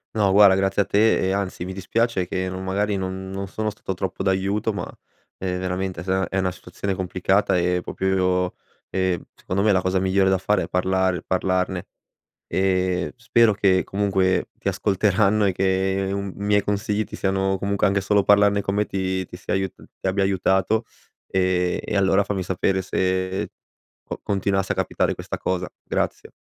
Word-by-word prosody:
No, 105 -3 +3
guarda 100 -2 +7
grazie 95 +1 +2
a - - 0
te 105 +3 +3
e, - - +1
anzi, 100 -3 -2
mi 95 - -5
dispiace 95 0 -1
che 95 +1 -2
no 95 0 -5
magari, 100 +2 -1
non 95 0 -4
non 95 0 -4
sono 110 +3 -2
stato 95 - -5
troppo 95 0 -4
d'aiuto 100 +3 0
ma, - - -4 0.5
ehm, 90 -1 -2
veramente 95 0 -3
è - - -6
za 95 0 0
è 95 - -3
una 95 -1 0
situazione 95 +2 -5
complicata, 95 +2 +1
e 90 +1 +1
proprio 95 - -3
io 90 -1 +1 0.3
e 95 -2 0
secondo 95 +2 -3
me, 105 0 +4
la 95 - +4
cosa 95 +1 +1
migliore 95 0 +3
da 95 - +3
fare 95 0 +1
è 85 - -5
parlare 95 -1 +1
parlarne. 95 0 -1 0.6
Ehm, 95 -1 0
spero 115 -1 +3
che 95 -2 +3
comunque 95 -2 +1
ti - - -1
ascolteranno 105 +1 +2
e 95 - +3
che 95 +1 0
un 100 -1 -3
miei 105 0 +2
consigli 105 +1 -1
ti - - -9
siano 95 0 0
comunque 100 +1 0
anche 100 0 +2
solo 100 0 +2
parlarne 100 0 +4
con 100 0 -2
me 105 0 +2
ti 95 -1 -2
ti 90 - -11
stia - - -4
aiut 95 -1 -1 0.3
ti - - -3
abbia 95 +1 +1
aiutato, 95 +3 +1 0.4
e 90 -1 +1
e 105 - -1
allora 95 +1 +3
fammi 100 -1 -2
sapere 95 +1 0
se 95 0 -1 0.5
co - - -7
continuasse 95 -1 0
a - - 0
capitare - - 0
questa - - -6
cosa, 90 -1 -2
grazie - - -2
95 Hz, 180 wpm, -23 LUFS, 95-100 Hz, 0.6 s, guarda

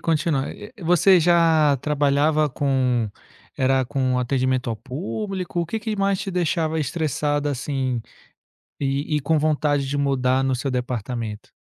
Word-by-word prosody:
continuar, 155 -4 0
eh 215 +4 -10
-eh, 190 - -12
você 180 +2 +5
já 160 -4 +4
trabalhava 150 +1 +2
com 130 -5 0 0.5
era 130 0 +2
com 130 -1 0
atendimento 130 -1 0
ao 110 - -2
público, 180 - -4
o 170 - -2
que 220 +6 -3
que 215 0 -3
mais 195 -1 +1
te 195 - -4
deixava 160 -2 0
estressada 145 -1 -1
assim, 130 -2 -2 0.8
e 140 +2 -1
e - - 0
com 155 +3 +1
vontade 145 -2 +1
de 140 +2 -2
mudar 135 -2 +1
no 130 -1 +1
seu 135 +2 -2
departamento? 120 -3 -4
145 Hz, 150 wpm, -23 LUFS, 130-160 Hz, 0.8 s, você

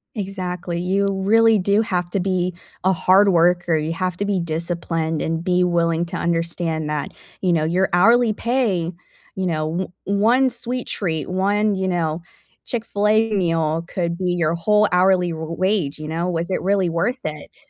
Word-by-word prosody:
Exactly. 180 -4 -4
You 195 +3 +1
really 225 +2 +4
do 200 +3 +2
have 180 -6 -2
to 200 - 0
be 180 -1 -1 0.3
a 190 +1 +3
hard 190 +3 +4
worker, 175 -1 +3
you 155 +1 -2
have 180 0 -2
to 200 - -2
be 200 -2 0
disciplined 165 -1 -2
and 165 0 -2
be 180 0 +2
willing 170 -1 +1
to - - -5
understand 165 -2 -1
that, 150 -1 -3 0.3
you 180 -2 +2
know, 160 -2 +1
your 180 +4 +1
hourly 225 +5 +4
pay, 210 -8 0 0.4
you 190 - -2
know, 160 0 -1
o 185 - -7 0.2
1 240 +6 +3
sweet 245 +1 -4
treat, 160 -7 -3
1, 200 +3 +1
you 190 0 -1
know, 170 -2 -1 0.4
Chick-fil-A 215 -1 +1
meal 165 -4 0
could 170 -2 -2
be 180 -1 -1
your 170 -2 +1
whole 210 +5 +3
hourly 180 -1 +3
r 160 0 -5
wage, 185 -6 0
you 155 - -6
know? 165 +3 -2
Was 170 0 -2
it - - -1
really 195 -1 +1
worth 170 +11 -1
it? 150 -1 -7
180 Hz, 175 wpm, -21 LUFS, 165-200 Hz, 0.4 s, really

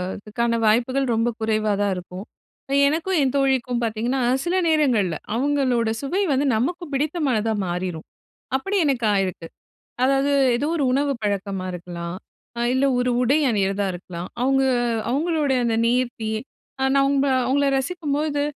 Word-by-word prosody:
அதுக்கான 230 +3 -2
வாய்ப்புகள் 250 +5 +2
ரொம்ப 230 +1 +1
குறைவா 215 -1 0
தான் 200 -2 +1
இருக்கும். 180 +2 -8 0.6
எனக்கும் 335 +5 0
என் 265 -1 +1
தோழிக்கும் 265 -3 +1
பார்த்தீங்கன்னா, 230 +4 -1 0.2
சில 350 +1 -1
நேரங்கள்ல 250 - +2 0.2
அவுங்களோட 255 -3 +1
சுவை 355 +9 -1
வந்து, 275 +2 +1
நமக்கு 345 +11 -1
பிடித்தமானதா 270 -7 0
மாறிரும். 175 -2 -4 0.5
அப்படி 385 +10 -2
எனக்கு 255 -5 0
ஆயிருக்கு. 185 -4 -1 0.6
அதாவது 275 +2 +2 0.2
எதோ 285 - -1
ஒரு 290 - 0
உணவு 280 +1 +1
பழக்கமா 200 -2 -2
இருக்கலாம். 175 0 -6 0.4
அ - - 0
இல்ல, 275 +1 +2
ஒரு 250 0 +1
உடை 270 +5 +3
அணியிறதா 200 -2 0
இருக்கலாம். 175 0 -7
அவுங்க 270 +1 +3 0.5
அவுங்களோட 305 +1 0
அந்த 230 -1 +1
நேர்த்தி, 240 -2 0 0.5
அ - - +3
நம்ப 275 0 +2 0.2
அவுங்கள 280 +2 +2
ரசிக்கும்போது, 295 -1 -2
250 Hz, 135 wpm, -23 LUFS, 210-280 Hz, 0.6 s, உடை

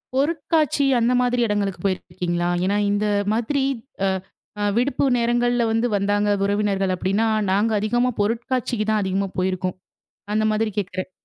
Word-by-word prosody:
பொருட்காட்சி 300 0 +1
அந்த 235 +2 +2
மாதிரி 245 0 +1
இடங்களுக்கு 200 -3 -1
போயிருக்கீங்களா? 175 -2 -1 0.2
ஏன்னா, 200 +2 +1
இந்த 205 +1 0 0.3
மாதிரி 250 +5 0 0.4
அ - - +3 0.5
அ - - 0
விடுப்பு 260 +4 +1
நேரங்கள்ல 240 0 +1
வந்து 225 +2 +1
வந்தாங்க 205 +1 +1 0.2
உறவினர்கள் 200 -2 0
அப்பிடின்னா, 195 +5 0 0.2
நாங்க 205 +4 +2
அதிகமா 240 +4 +1
பொருட்காட்சிக்கு 230 +1 -1
தான் 215 -1 +2
அதிகமா 195 +1 -1
போயிருக்கோம். 185 0 -1 0.6
அந்த 215 0 +2
மாதிரி 215 0 0
கேட்கிறேன். 185 -1 -3
210 Hz, 135 wpm, -22 LUFS, 195-240 Hz, 0.6 s, அ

